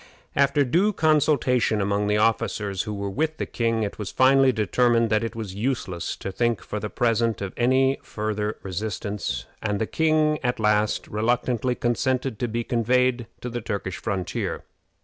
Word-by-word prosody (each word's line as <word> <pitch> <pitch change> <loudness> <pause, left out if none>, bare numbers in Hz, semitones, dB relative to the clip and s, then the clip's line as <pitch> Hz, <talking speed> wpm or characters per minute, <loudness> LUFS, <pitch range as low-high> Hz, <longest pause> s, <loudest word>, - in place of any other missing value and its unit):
After 140 +1 +3
due 185 +11 +2
consultation 145 - +2
among 100 +1 0
the 105 0 +2
officers 105 -3 0
who 105 - -4
were 100 0 -3
with 155 +7 -1
the - - -2
king, 115 -1 0
it 100 - -4
was 105 - -4
finally 135 0 +5
determined 115 0 +2
that 110 +1 +2
it 115 +1 -4
was 110 -5 -5
useless 100 -6 -2
to 95 - -6
think 120 +3 0
for 105 - -4
the 105 +1 -4
present 115 -1 +1
of 100 -1 -5
any 130 +2 +2
farther 105 0 -3
resistance, 100 - -3 0.2
and 105 -2 -1
the 110 - +1
king, 155 +2 +2
at 125 -2 0
last, 105 0 +1
reluctantly 120 +2 0
consented 125 0 -1
to 120 - 0
be 120 +1 -2
conveyed 120 +1 +1
to 125 - -4
the 120 0 -3
Turkish 100 -4 -4
frontier. 95 -5 -3
115 Hz, 170 wpm, -24 LUFS, 105-130 Hz, 0.2 s, finally